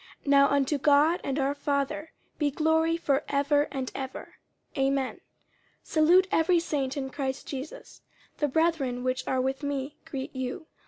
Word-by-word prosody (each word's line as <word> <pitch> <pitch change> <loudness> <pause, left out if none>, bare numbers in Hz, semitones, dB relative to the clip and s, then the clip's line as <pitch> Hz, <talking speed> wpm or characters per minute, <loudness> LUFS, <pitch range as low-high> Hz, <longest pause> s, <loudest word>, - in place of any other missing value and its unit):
50:004:020 - - -21
Now 280 0 +7
unto 280 +1 +1
God 295 +5 +4
and 275 0 -2
our 275 0 +1
Father 290 +2 -2 0.3
be 295 -2 +2
glory 320 +3 +2
for 280 -5 +1
ever 285 +1 +2
and 265 -2 -4
ever. 265 -1 -7 0.4
Amen. 270 -1 0
50:004:021 - - -25 0.6
Salute 345 +4 +4
every 340 -1 +3
saint 285 -5 -2
in 265 -1 -3
Christ 265 -1 -3
Jesus. 275 +2 -8 0.4
The 295 - +2
brethren 280 -5 0
which 255 0 -2
are 260 - +1
with 265 +2 -1
me 285 0 -3
greet 275 -4 -6
you. 260 +4 -4
280 Hz, 160 wpm, -28 LUFS, 265-310 Hz, 0.6 s, Now